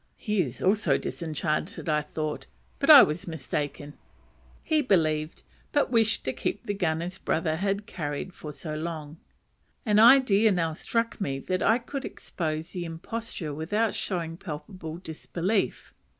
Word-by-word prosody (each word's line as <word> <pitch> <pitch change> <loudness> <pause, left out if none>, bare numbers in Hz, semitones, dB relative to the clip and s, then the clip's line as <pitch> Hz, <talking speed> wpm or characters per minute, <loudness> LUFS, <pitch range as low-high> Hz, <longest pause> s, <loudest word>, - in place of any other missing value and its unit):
He 210 -3 0
is 130 -6 -4
also 205 +3 +3
disenchanted, 160 +2 -3 0.2
thought 155 -1 -3
I, - - -30 0.3
but - - 0
I - - +12
was 155 +4 -2
mistaken; 145 -1 -4 0.7
he 315 -2 +2
believed, 155 - +1 0.3
but 290 -4 +2
wished 225 -2 +2
to 130 - -1
keep 205 - -3
the 205 - -1
gun 165 -5 0
his 180 +2 -5
brother 160 -1 0
had 200 +2 -1
carried 155 -1 -4
so 155 0 -7
long. 155 -1 -5 0.7
An 210 -2 +4
idea 225 -3 +7
now 165 -4 0
struck 230 +7 -2
me 135 -7 -1
that 185 +7 -2
I 225 - +4
could 270 +3 -6
expose 160 -7 -4
the 180 - -4
imposture 165 0 -5
without 205 +9 0
showing 175 -6 -3
palpable 165 -1 -7
disbelief. 180 +4 -2
175 Hz, 145 wpm, -27 LUFS, 155-210 Hz, 0.7 s, I